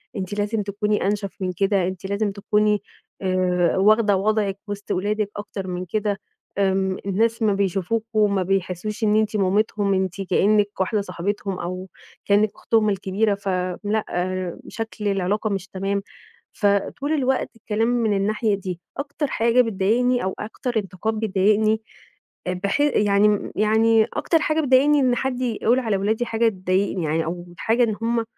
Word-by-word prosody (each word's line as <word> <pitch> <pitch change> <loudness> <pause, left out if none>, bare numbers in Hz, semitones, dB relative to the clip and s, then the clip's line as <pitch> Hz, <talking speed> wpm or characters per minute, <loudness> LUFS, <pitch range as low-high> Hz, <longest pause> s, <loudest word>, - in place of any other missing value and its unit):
أنتِ 190 0 -4
لازم 210 +1 -1
تكوني 210 +1 -1
أنشف 200 -1 -1
من 185 -1 -1
كده، 195 -2 +2
أنتِ 185 0 -6
لازم 200 +1 -1
تكوني 210 +1 +1 0.4
آآ، 185 -2 +1
واخدة 210 +1 +4
وضعِك 205 -1 0
وسط 205 0 -6
ولادِك 205 +2 0
أكتر 205 -2 -6
من 180 0 -4
كده، 205 +2 -1 0.4
آمم، 190 -1 +1
الناس 225 +4 +1
أمّا 210 -2 +3
بيشوفوكم 205 +2 0
ما 190 - +1
بيحسوش 195 +3 -2
إن 210 0 +3
أنتِ 215 0 +1
مامتهُم، 200 +1 +1
أنتِ 190 0 -1
كأنِّك 205 +2 +3
واحدة 195 +3 +1
صاحبتهم 195 +1 -3
أو 185 +2 -5 0.4
كأنِّك 205 +1 +3
أختهم 220 -2 +1
الكبيرة، 200 +2 0
ف 200 0 -10 0.4
لأ، 215 +1 0 0.6
شكل 225 -2 -5
العلاقة 200 +2 0
مش 195 -2 -3
تمام، 195 +1 -2 0.5
فطول 205 +8 0
الوقت 265 -3 +1
الكلام 225 0 -1
من 235 -3 +1
الناحية 210 +1 +1
دي، 185 -3 -5 0.2
أكتر 285 +1 -3
حاجة 235 +1 +3
بتضايقني 235 +3 +1
أو 190 - -1
أكتر 230 +2 -3
انتقاد 200 +2 -2
بيضايقني، 215 +1 +2 0.7
بحي 200 +11 +1
يعني 205 -1 +2
يعني 220 +1 +4
أكتر 330 - +2
حاجة 310 +1 +1
بتضايقني 285 +1 +4
إن 255 -2 +3
حد 255 0 -2
يقول 240 0 +1
على 220 -5 0
ولادي 220 +5 0
حاجة 230 0 +2
تضايقني، 185 -2 -1
يعني 160 +1 0
أو 175 +2 -4
حاجة 235 +2 +2
إن 220 -3 +1
هُم 230 0 +1
205 Hz, 150 wpm, -23 LUFS, 195-220 Hz, 0.7 s, واخدة